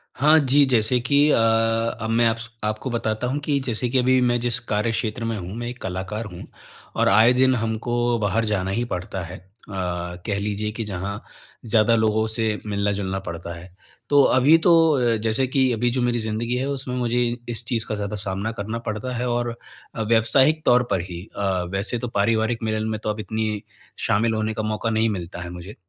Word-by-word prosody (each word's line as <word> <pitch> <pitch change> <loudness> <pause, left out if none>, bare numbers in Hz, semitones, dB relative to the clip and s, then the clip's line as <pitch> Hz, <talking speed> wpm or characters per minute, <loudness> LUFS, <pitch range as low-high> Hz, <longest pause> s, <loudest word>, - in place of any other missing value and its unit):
हाँ, 155 +4 +5
जी। 140 +1 +4
जैसे 120 +1 +3
कि 140 +4 +1
अ, - - +4
अब 115 0 +1
मैं 115 +1 +3
आप्स 115 0 -2
आपको 110 +4 -2
बताता 110 0 -1
हूँ 140 +3 -1
कि 145 -2 +1
जैसे 120 0 -1
कि 130 - +1
अभी 130 +1 +4
मैं 120 -1 +2
जिस 120 0 0
कार्यक्षेत्र 110 +2 -1
में 115 -1 -2
हूँ 90 +1 -6
मैं 120 0 -4
1 125 0 -7
कलाकार 95 +4 -4
हूँ 85 - -8 0.5
और - - +3
आए 115 +3 +6
दिन 130 0 +3
हमको 115 +1 -2 0.3
बाहर 110 +2 +1
जाना 95 -3 -1
ही 120 +4 0
पड़ता 90 +1 -4
है। 90 +3 -8
अ, 90 - -25 0.2
कह 90 +1 -3
लीजिए 105 +1 -2
कि 115 +1 -4
जहाँ 100 +1 -4 0.4
ज़्यादा 115 0 +4
लोगों 110 0 +2
से 110 -1 -1
मिलना-जुलना 100 -2 -1
पड़ता 85 -2 -6
है। 90 +1 -12 0.4
तो 145 -1 +6 0.2
अभी 145 +6 +6
तो 170 - +7 0.4
अ, - - +1
जैसे 115 +4 0
कि 130 -1 +2
अभी 120 +2 +1
जो 125 +1 -1
मेरी 120 -1 +1
ज़िन्दगी 115 +2 -2
है 130 - -1
उसमें 130 -2 -4
मुझे 120 0 0
इ - - -2 0.2
इस 115 +1 -5
चीज़ 115 -2 -1
का 110 - -2
ज़्यादा 105 +1 -3
सामना 100 +3 -2
करना 110 +3 -3
पड़ता 110 +4 -4
है 125 +2 -2
और 120 -1 -1 0.4
अ, 115 - -3
व्यावसायिक 120 +8 +3
तौर 125 0 +5
पर 95 -3 +2
ही 85 0 -6 0.2
अ, 95 -3 0
वैसे 100 +5 -2
तो 125 - -3
पारिवारिक 110 +2 +1
मिलन 110 0 -1
में 110 -1 -2
तो 110 - -1
अब 105 - -3
इतनी 110 0 -2 0.5
शामिल 110 +2 +2
होने 110 0 -1
का 110 0 -3
मौका 110 +1 -1
नहीं 110 0 +2
मिलता 90 -3 -5
है 85 - -6
मुझे। 90 +4 -9
110 Hz, 205 wpm, -23 LUFS, 105-120 Hz, 0.5 s, तो